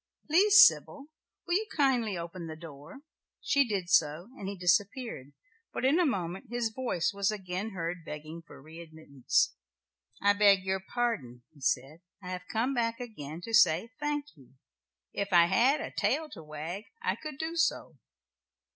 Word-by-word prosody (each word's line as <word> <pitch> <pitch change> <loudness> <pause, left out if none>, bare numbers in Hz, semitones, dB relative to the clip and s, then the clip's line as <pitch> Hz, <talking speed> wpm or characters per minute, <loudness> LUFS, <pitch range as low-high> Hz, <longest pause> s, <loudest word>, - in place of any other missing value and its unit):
"Please, 405 +6 +8
Sybil, 285 +1 0 0.4
will 345 - -2
you 425 +4 +1
kindly 245 - +2
open 170 0 -7
the 160 - -7
door?" 155 - -12 0.4
She 280 0 +3
did 195 -5 -2
so, 170 0 +2
and 195 - -7
he 200 - -6
disappeared, 185 - 0 0.4
but - - -3
in 290 +6 +4
a 350 - +3
moment 190 -2 -3
his 235 -2 -2
voice 225 -8 -1
was 200 0 0
again 195 0 -4
heard 170 0 -4
begging 155 +2 -8
for 165 - -15
re 160 +4 -12
admittance. 140 -6 -1 0.7
"I 205 0 +4
beg 200 -2 +5
your 190 0 -1
pardon," 190 - -3
he 145 - -20
said, 135 +5 -1 0.2
"I 180 -3 -9
have 180 0 -6
come 235 +5 0
back 230 -2 -1
again 170 - -8
to 225 +5 -8
say 180 +1 +4
'thank 295 0 -3
you.' 135 -2 -20 0.6
If 200 0 -3
I 170 -1 +7
had 235 - +3
a - - -5
tail 315 0 0
to 165 - -9
wag 160 +7 -7 0.2
I - - 0
could 305 -3 -8
do 320 +2 -4
so." 325 -1 -1
195 Hz, 170 wpm, -30 LUFS, 165-245 Hz, 0.7 s, Please